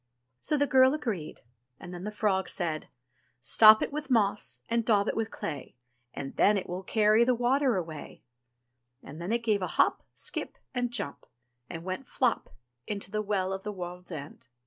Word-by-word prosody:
So 300 Hz, -, +1 dB
the 285 Hz, -, +3 dB
girl 260 Hz, +1 st, +5 dB
agreed, 210 Hz, -, -4 dB, 0.4 s
and 175 Hz, -, -9 dB
then 175 Hz, +2 st, -7 dB
the -, -, -2 dB
frog 205 Hz, -3 st, 0 dB
said: 160 Hz, -4 st, -2 dB, 0.5 s
"Stop 215 Hz, -, +7 dB
it -, -, -4 dB
with 300 Hz, 0 st, -4 dB
moss 210 Hz, -5 st, +1 dB
and 235 Hz, 0 st, +1 dB
daub 210 Hz, -2 st, +3 dB
it -, -, -1 dB
with 225 Hz, 0 st, -1 dB
clay. 145 Hz, -9 st, -6 dB, 0.4 s
And 135 Hz, +2 st, -7 dB
then 210 Hz, 0 st, +5 dB
it 190 Hz, -, -4 dB
will 180 Hz, +1 st, -4 dB
carry 215 Hz, +3 st, +4 dB
the 250 Hz, +1 st, +3 dB
water 250 Hz, 0 st, +2 dB
away"; 160 Hz, -4 st, -7 dB, 0.8 s
and 155 Hz, +4 st, -9 dB
then 175 Hz, +5 st, -3 dB
it 235 Hz, 0 st, 0 dB
gave 215 Hz, -3 st, +1 dB
a 185 Hz, -, -1 dB
hop, -, -, +3 dB
skip, -, -, -4 dB, 0.2 s
and 245 Hz, -1 st, 0 dB
jump, 145 Hz, -11 st, -4 dB, 0.4 s
and 165 Hz, 0 st, -6 dB
went 185 Hz, +9 st, -5 dB
flop 250 Hz, -3 st, 0 dB, 0.4 s
into 200 Hz, -2 st, -4 dB
the 215 Hz, -, 0 dB
Well 195 Hz, -2 st, -1 dB
of 190 Hz, -, -4 dB
the 210 Hz, +1 st, -4 dB
World's 180 Hz, -1 st, -7 dB
End. 145 Hz, -5 st, -8 dB
210 Hz, 185 wpm, -29 LUFS, 180-235 Hz, 0.8 s, Stop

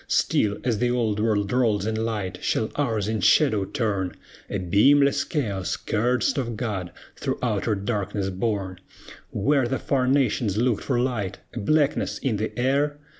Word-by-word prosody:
Still 105 Hz, -1 st, +1 dB
as 120 Hz, -4 st, 0 dB
the 120 Hz, +1 st, +2 dB
Old 115 Hz, -4 st, 0 dB
World 105 Hz, -2 st, +1 dB
rolls 115 Hz, -5 st, +2 dB
in 110 Hz, -, -1 dB
light, 105 Hz, -5 st, -3 dB
shall 110 Hz, -, 0 dB
ours 115 Hz, -8 st, -1 dB
in 110 Hz, -1 st, -1 dB
shadow 110 Hz, -11 st, +4 dB
turn, 100 Hz, -, -2 dB, 0.3 s
A -, -, -2 dB
beamless 140 Hz, +10 st, +4 dB
Chaos, 100 Hz, -, -2 dB
cursed 120 Hz, +5 st, 0 dB
of 120 Hz, -4 st, -3 dB
God, 100 Hz, -7 st, -3 dB, 0.2 s
through -, -, -2 dB
outer 110 Hz, -, 0 dB
darkness 100 Hz, -1 st, -2 dB
borne? 95 Hz, -2 st, -2 dB, 0.5 s
Where 135 Hz, +3 st, +1 dB
the 135 Hz, +2 st, -1 dB
far 130 Hz, -2 st, 0 dB
nations 125 Hz, -6 st, +1 dB
looked 120 Hz, -1 st, +1 dB
for 125 Hz, -3 st, +1 dB
light, 120 Hz, -7 st, -1 dB, 0.2 s
a -, -, -4 dB
blackness 150 Hz, +6 st, +1 dB
in 125 Hz, -7 st, -1 dB
the 110 Hz, +2 st, -2 dB
air? 140 Hz, +4 st, +1 dB
110 Hz, 160 wpm, -24 LUFS, 100-130 Hz, 0.5 s, shadow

